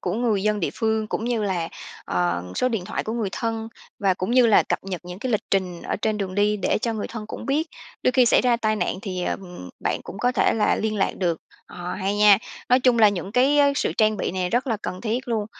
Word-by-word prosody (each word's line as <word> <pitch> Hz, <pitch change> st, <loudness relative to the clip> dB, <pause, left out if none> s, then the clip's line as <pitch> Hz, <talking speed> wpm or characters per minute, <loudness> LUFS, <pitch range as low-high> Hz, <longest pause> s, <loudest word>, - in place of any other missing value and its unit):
của 180 Hz, -, -2 dB
người 220 Hz, -4 st, +1 dB
dân 210 Hz, 0 st, +1 dB
địa -, -, 0 dB
phương 220 Hz, -2 st, 0 dB
cũng 220 Hz, -, -3 dB
như 235 Hz, -2 st, 0 dB
là, 180 Hz, -5 st, -1 dB, 0.4 s
ờ, 90 Hz, -1 st, 0 dB
số 255 Hz, -, +1 dB
điện 225 Hz, -7 st, -2 dB
thoại -, -, -3 dB
của 220 Hz, -, -3 dB
người 230 Hz, -4 st, -1 dB
thân 225 Hz, -1 st, -3 dB, 0.3 s
và 195 Hz, -2 st, +2 dB
cũng 185 Hz, +3 st, -3 dB
như 245 Hz, -1 st, +5 dB
là 215 Hz, -, +6 dB
cập -, -, -1 dB
nhật 185 Hz, -3 st, -4 dB
những 180 Hz, +1 st, -8 dB
cái 250 Hz, +3 st, -3 dB
lịch 215 Hz, -, +1 dB
trình 185 Hz, -3 st, -1 dB
ở -, -, -2 dB
trên 215 Hz, +1 st, -1 dB
đường 190 Hz, -2 st, -3 dB
đi 210 Hz, +1 st, +2 dB
để 195 Hz, -, 0 dB
cho 235 Hz, -2 st, 0 dB
người 215 Hz, -2 st, -3 dB
thân 220 Hz, -2 st, -7 dB
cũng -, -, -7 dB
biết. 305 Hz, +4 st, 0 dB, 0.3 s
Đôi 255 Hz, -, +3 dB
khi 255 Hz, -2 st, +4 dB
xảy -, -, +5 dB
ra 245 Hz, -1 st, +3 dB
tai 215 Hz, -2 st, 0 dB
nạn 185 Hz, -1 st, -1 dB
thì, 185 Hz, -3 st, -4 dB
ờ, -, -, 0 dB
ừm, 180 Hz, -, -10 dB
bạn -, -, -1 dB
cũng -, -, -9 dB
có 245 Hz, +2 st, +1 dB
thể -, -, +3 dB
là 215 Hz, -2 st, +2 dB
liên 215 Hz, 0 st, -1 dB
lạc 195 Hz, -, 0 dB
được. 170 Hz, -4 st, 0 dB, 0.3 s
Ờ, 175 Hz, 0 st, -6 dB
hay 195 Hz, +1 st, -2 dB
nha! 205 Hz, -1 st, +7 dB, 0.3 s
Nói 250 Hz, +1 st, +5 dB
chung 250 Hz, -2 st, +3 dB
là 215 Hz, -2 st, +7 dB
những 195 Hz, 0 st, -4 dB
cái 270 Hz, +5 st, +4 dB
á, 285 Hz, -1 st, +5 dB
sự -, -, 0 dB
trang 215 Hz, -1 st, +3 dB
bị -, -, -2 dB
này 180 Hz, -1 st, -2 dB
rất 245 Hz, +4 st, +1 dB
là 230 Hz, -4 st, 0 dB
cần 185 Hz, -, -5 dB
thiết 240 Hz, +3 st, -2 dB
luôn. 220 Hz, -3 st, -1 dB
215 Hz, 270 wpm, -23 LUFS, 190-235 Hz, 0.4 s, nha